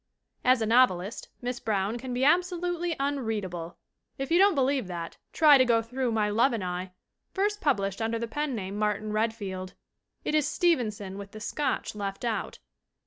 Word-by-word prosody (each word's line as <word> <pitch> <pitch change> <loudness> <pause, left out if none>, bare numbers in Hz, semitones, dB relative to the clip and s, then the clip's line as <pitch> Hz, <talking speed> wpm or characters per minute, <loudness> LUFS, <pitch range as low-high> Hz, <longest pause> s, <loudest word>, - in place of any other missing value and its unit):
As 250 -2 +4
a - - +1
novelist 220 -4 +2
Miss 245 0 -2
Brown 210 +2 -1
can 255 +1 -6
be 250 +2 +1
absolutely 350 0 +1
un 280 +1 0
readable. 185 -8 -4 0.4
If 270 +3 -4
you 340 - +5
don't 395 -2 +5
believe 270 -4 +1
that 170 -2 -6
try 300 -4 +6
to - - +7
go 230 -2 +3
through 250 +1 -2
My 215 -2 +1
Love 235 +5 +3
and 220 -4 -2
I, 180 +1 -4 0.4
first 415 +2 0
published 200 - 0
under 225 +1 0
the 230 +1 -3
pen 295 +2 -2
name 200 -1 -4
"Martin 210 0 -1
Redfield." 205 -4 -2 0.5
It - - -1
is 305 -2 +3
Stevenson 215 - 0
with 200 0 -9
the 215 - -8
Scotch 280 +6 -2
left 200 +1 -4
out. 230 -2 -2
230 Hz, 180 wpm, -28 LUFS, 200-275 Hz, 0.5 s, to